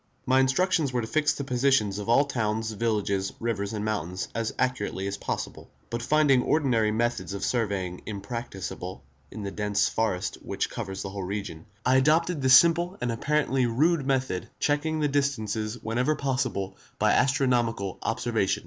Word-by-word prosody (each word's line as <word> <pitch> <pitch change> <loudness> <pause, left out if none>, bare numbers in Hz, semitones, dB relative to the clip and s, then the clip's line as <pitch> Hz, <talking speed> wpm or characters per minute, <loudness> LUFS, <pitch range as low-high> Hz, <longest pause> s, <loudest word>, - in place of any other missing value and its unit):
My 130 +1 +4
instructions 145 +2 +2
were 125 -1 0
to - - -3
fix 150 +4 +2
the 140 - -4
positions 125 -6 +2
of 105 - -5
all 135 +5 +5
towns, 110 -4 -1
villages, 105 -3 -1
rivers 100 -4 -2
and 105 -1 -3
mountains 95 -4 -3
as 115 0 -1
accurately 125 -6 -1
as 100 0 -2
possible; - - -5 0.2
but 120 0 -2
finding 140 0 +4
ordinary 125 -8 +2
methods 115 -1 -1
of 100 - -2
surveying 100 -7 -1
impracticable 100 - -6 0.3
in 110 - -7
the 100 - -4
dense 105 -1 +1
forest 100 -5 -1
which 100 0 -3
covers 95 -5 -5
the 95 - -5
whole 100 0 -5
region, 95 -4 -5 0.2
I 130 +1 +5
adopted 155 +3 +3
this 130 -1 +8
simple 170 +2 +3
and 120 -1 -1
apparently 135 0 +1
rude 150 +7 +2
method, 130 -9 -1
checking 155 +2 0
the 150 - +3
distances 115 -6 -1
whenever 125 +7 +1
possible 130 -9 -2 0.2
by - - +3
astronomical 120 - +1
observation. 115 -4 0
115 Hz, 160 wpm, -27 LUFS, 100-135 Hz, 0.3 s, this